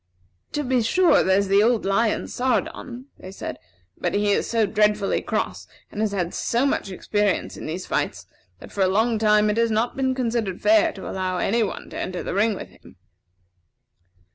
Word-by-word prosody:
"To 295 Hz, -, -1 dB
be 255 Hz, -2 st, +1 dB
sure, 350 Hz, +11 st, +4 dB
there's 195 Hz, +1 st, +2 dB
the 200 Hz, +1 st, +4 dB
old 230 Hz, +1 st, +2 dB
lion, 215 Hz, +3 st, +1 dB
Sardon," 250 Hz, +1 st, -2 dB
they 185 Hz, -, -9 dB
said; 195 Hz, -, -7 dB, 0.4 s
"but -, -, -2 dB
he 205 Hz, 0 st, +2 dB
is -, -, 0 dB
so 225 Hz, -2 st, +2 dB
dreadfully 210 Hz, 0 st, +1 dB
cross -, -, -3 dB, 0.2 s
and 210 Hz, -, -4 dB
has 215 Hz, -2 st, +1 dB
had 180 Hz, -3 st, -2 dB
so 240 Hz, +3 st, 0 dB
much 275 Hz, -7 st, -1 dB
experience 205 Hz, +1 st, -1 dB
in -, -, -7 dB
these 175 Hz, +4 st, -4 dB
fights, -, -, -2 dB, 0.3 s
that -, -, -13 dB
for 200 Hz, -, -3 dB
a 190 Hz, -, +5 dB
long 220 Hz, +4 st, +1 dB
time 210 Hz, -1 st, +4 dB
it 210 Hz, -, -3 dB
has 230 Hz, 0 st, +3 dB
not 225 Hz, +2 st, 0 dB
been 260 Hz, -1 st, 0 dB
considered 230 Hz, -6 st, -1 dB
fair 325 Hz, 0 st, +4 dB
to 190 Hz, -, -8 dB
allow 185 Hz, -1 st, -2 dB
any 230 Hz, +6 st, +1 dB
one 210 Hz, -, -4 dB
to -, -, -6 dB
enter 185 Hz, -1 st, -4 dB
the -, -, -4 dB
ring 210 Hz, +2 st, +2 dB
with -, -, -8 dB
him." -, -, -18 dB
215 Hz, 190 wpm, -23 LUFS, 195-235 Hz, 0.4 s, a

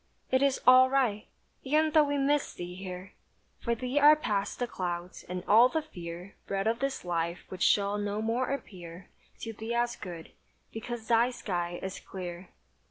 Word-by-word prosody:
"It 260 Hz, 0 st, +3 dB
is 275 Hz, -1 st, +2 dB
all 255 Hz, +1 st, +8 dB
right." 250 Hz, -6 st, +1 dB, 0.4 s
E'en 310 Hz, +3 st, +2 dB
though 305 Hz, -1 st, +5 dB
we 285 Hz, 0 st, -1 dB
miss 280 Hz, +1 st, +1 dB
thee 175 Hz, 0 st, -6 dB
here. 185 Hz, 0 st, -8 dB, 0.5 s
For 235 Hz, -1 st, -1 dB
thee 255 Hz, +4 st, -1 dB
are 295 Hz, +1 st, +8 dB
past 205 Hz, -9 st, -2 dB
the 245 Hz, -, -1 dB
clouds, 180 Hz, -4 st, -5 dB
and 180 Hz, 0 st, -4 dB
all 230 Hz, +5 st, +7 dB
the 320 Hz, +3 st, -1 dB
fear 175 Hz, -, -9 dB
Bred 195 Hz, 0 st, -1 dB
of 230 Hz, +1 st, +1 dB
this 275 Hz, -6 st, -2 dB
life 170 Hz, 0 st, -2 dB
which 185 Hz, -1 st, -8 dB
shall 205 Hz, 0 st, +3 dB
no 205 Hz, 0 st, -2 dB
more 230 Hz, +4 st, 0 dB
appear 180 Hz, -9 st, -7 dB, 0.3 s
To 225 Hz, -, -5 dB
thee 220 Hz, +2 st, -4 dB
as 240 Hz, 0 st, 0 dB
good; 170 Hz, -4 st, -9 dB, 0.4 s
because 225 Hz, 0 st, -6 dB
thy 235 Hz, +1 st, +4 dB
sky 175 Hz, -7 st, -3 dB
is 190 Hz, 0 st, -5 dB
clear. 180 Hz, -1 st, -8 dB
215 Hz, 175 wpm, -29 LUFS, 180-255 Hz, 0.5 s, all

